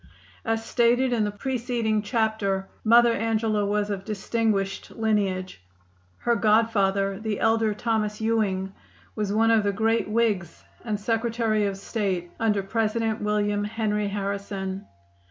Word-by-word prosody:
As 225 -1 -1
stated 245 +2 +2
in 220 -3 +2
the - - -1
preceding 230 -1 -1
chapter 210 -3 0 0.2
Mother 235 +1 +6
Angela 220 -2 0
was 205 0 0
of 195 -1 -3
distinguished 205 -1 -1
lineage. 195 - -1 0.6
Her 235 - +1
godfather, 200 -3 +2
the 215 -2 -3
elder 225 -1 +2
Thomas 215 -1 -1
Ewing, 205 -4 0 0.4
was 210 -2 -2
one 225 +2 +3
of 225 -1 +5
the 205 0 0
great 225 +2 +1
Whigs 210 -6 0 0.2
and 215 -3 -2
Secretary 225 -1 0
of 195 -1 -3
State 195 -4 -2
under 210 -3 +1
President 225 +1 -1
William 205 0 0
Henry 210 -1 -1
Harrison. 200 -1 -4
215 Hz, 130 wpm, -25 LUFS, 200-225 Hz, 0.6 s, Mother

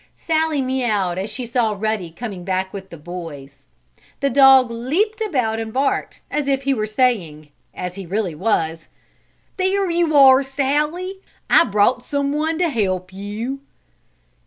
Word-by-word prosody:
Sallie 315 -3 0
meaouwed 215 -9 0
as 195 +3 -3
she 245 +4 -5
saw 235 -2 0
Ruddy 215 -4 -2
coming 190 +1 -7
back 190 0 -2
with 190 -1 -8
the 170 - -10
boys. 150 -4 -9 0.5
The 280 -1 0
dog 265 -2 +6
leaped 345 - -1
about 250 - 0
and 225 -1 -5
barked, 270 +4 -1
as 295 -1 -1
if 275 -1 0
he 275 0 +2
were 215 -4 -2
saying, 200 - 0 0.3
as 180 -1 -5
he 195 -1 -8
really 195 -1 -1
was: 165 -2 -1 0.7
"There 380 0 +1
you 335 -2 +1
are, 265 -1 +8
Sallie! 300 +8 -1 0.3
I - - +7
brought 210 +5 +2
someone 295 +3 -1
to 350 -1 +1
help 185 - -2
you!" 210 +7 -5
240 Hz, 150 wpm, -20 LUFS, 190-280 Hz, 0.7 s, are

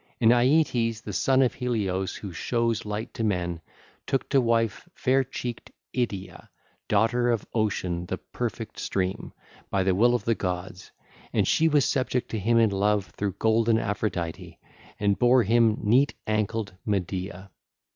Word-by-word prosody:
And 115 -1 +5
Aeetes, 120 -3 +2
the - - -6
son 135 0 +3
of 125 - +1
Helios 100 -7 -2
who 100 -4 -7
shows 115 - -1
light 105 +2 -4
to 115 - -3
men, 90 -5 -1 0.5
took 135 -1 0
to 135 - +4
wife 115 - 0
fair 135 +1 +2
cheeked 125 -2 -6 0.3
Idyia, 100 -8 -3 0.4
daughter 115 +4 +2
of 115 -3 0
Ocean 90 -6 -1
the 95 - -3
perfect 115 0 -5
stream, 95 -1 -2 0.4
by 95 -1 +1
the 95 0 +2
will 120 +6 +4
of 120 - -2
the 115 - +3
gods: 90 -2 -4 0.4
and - - +2
she 160 - +3
was 145 -3 +3
subject 130 -2 -1
to 110 - -2
him 115 +4 +2
in 115 -2 +4
love 100 0 +1
through 100 -2 -2
golden 110 +2 +2
Aphrodite 90 -5 -3 0.4
and 100 -1 +1
bare 125 0 +5
him 115 +1 +3
neat 125 +7 +3
ankled 110 -1 -1
Medea. 95 -1 -3
110 Hz, 155 wpm, -26 LUFS, 95-120 Hz, 0.5 s, And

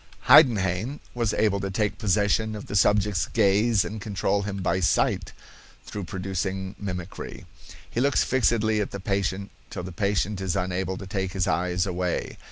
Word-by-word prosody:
Heidenhain 115 - +4
was 115 -3 0
able 100 -3 +1
to 100 0 -3
take 105 +2 -1
possession 105 +1 +1
of 105 - -7
the - - -5
subject's 105 -2 +3
gaze 105 0 +3
and 110 0 -6
control 100 0 0
him 100 -1 -4
by 95 +1 +1
sight, 90 - +1 0.5
through 100 -3 -6
producing 95 +1 -3
mimicry. 90 -4 -6 0.4
He 120 - -2
looks 140 +1 +3
fixedly 110 -4 +2
at 100 - -2
the 100 - -6
patient 100 0 -2 0.2
till 90 - -6
the 90 - -6
patient 100 +2 -1
is 95 -3 -1
unable 95 0 -2
to 95 - -7
take 95 -1 -3
his 95 -2 0
eyes 90 +2 0
away. 90 -2 -2
100 Hz, 165 wpm, -25 LUFS, 95-105 Hz, 0.5 s, Heidenhain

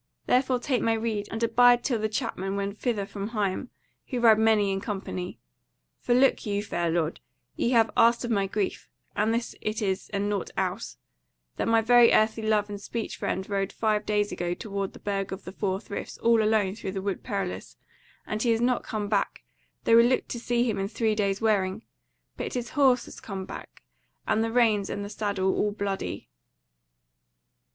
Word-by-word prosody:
Therefore 255 0 +2
take 250 0 -1
my 225 - +2
rede, 220 -2 -2
and 225 +3 -3
abide 245 +1 +5
till 240 -5 0
the 215 0 -1
Chapmen 205 -4 -3
wend 200 0 -2
thither 225 -6 -1
from 200 0 -5
Higham, 210 +2 -2 0.4
who 250 - -2
ride 225 -2 +6
many 215 -3 +3
in 195 0 -2
company. 190 -4 -5 0.6
For, 240 - +1
look 270 +2 +4
you, 205 -2 -1
fair 175 -4 -1
lord, 165 -1 -1 0.4
ye - - 0
have 225 -2 +4
asked 235 +1 +4
of 240 - -3
my 200 -3 +1
grief, 200 0 -3 0.3
and 215 +2 +2
this 235 +1 -1
it 215 +1 -2
is 195 -2 -2
and 200 0 -1
nought 205 -2 -2
else; - - -2 0.6
that - - -1
my 225 0 +4
very 240 +1 +6
earthly 220 +1 +3
love 215 -1 +1
and 205 -1 -7
speech 230 +2 -4
friend 190 0 -3
rode 195 -1 -1
five 215 -1 0
days 210 0 0
ago 175 0 -2
toward 200 -2 -4
the - - -12
Burg 195 -1 -2
of 190 +1 -6
the 185 - -7
Four 190 -1 -2
Friths 200 -1 -7
all 230 -1 +3
alone 215 -3 +2
through 195 -3 -6
the 195 - -3
Wood 200 -2 -2
Perilous, 195 -3 -4 0.5
and 215 0 -3
he 240 - +1
has 225 -1 +3
not 245 +1 +2
come 210 -2 -3
back, 205 -1 -1 0.4
though 230 - +5
we - - +9
looked 245 +2 +2
to 240 - -4
see 240 0 +1
him 210 -4 -1
in 195 - -1
three 220 +1 0
days' 200 -1 0
wearing: 205 -1 +1 0.5
but - - -4
his 240 -1 -3
horse 265 -4 +3
has - - -11
come 195 -2 -6
back, - - -10 0.4
and 220 - +2
the 225 - -1
reins 225 -4 +3
and 200 0 -3
the - - -7
saddle 200 -3 0
all 210 - +1
bloody." 200 -1 -4
215 Hz, 195 wpm, -27 LUFS, 200-230 Hz, 0.6 s, we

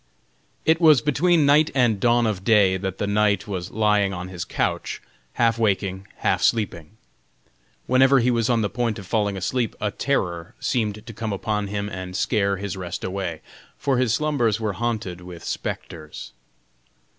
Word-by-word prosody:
It 160 +2 +3
was 155 -5 +7
between 150 +4 +2
night 150 +2 +5
and 120 -6 +3
dawn 120 +2 +3
of 100 -4 -2
day 100 -4 +4
that 95 0 -4
the - - -1
knight 100 -1 +1
was 95 -2 -4
lying 105 -2 +2
on 90 0 -6
his 90 -2 -5
couch, - - -2 0.3
half 115 -1 +2
waking, 100 -3 0 0.2
half - - +2
sleeping. 105 -3 0 0.9
Whenever 130 +2 +5
he 125 +1 +2
was 115 -1 +1
on 115 -2 +2
the - - +1
point 120 -3 -1
of 100 - -9
falling 100 -1 0
asleep 115 +5 -1
a 105 - -1
terror 95 -7 -2
seemed 110 -3 -1
to 115 - -9
come 110 0 -4
upon 105 +1 -2
him 100 0 -3
and 95 -2 -6
scare 100 -2 +1
his 100 -1 -4
rest 90 -2 -6
away, 95 -4 -4 0.4
for 135 -3 0
his 125 -3 +2
slumbers 120 -5 +1
were 110 -2 -1
haunted 105 -4 -3
with 90 -1 -10
spectres. 75 -5 -6
105 Hz, 170 wpm, -23 LUFS, 95-120 Hz, 0.9 s, was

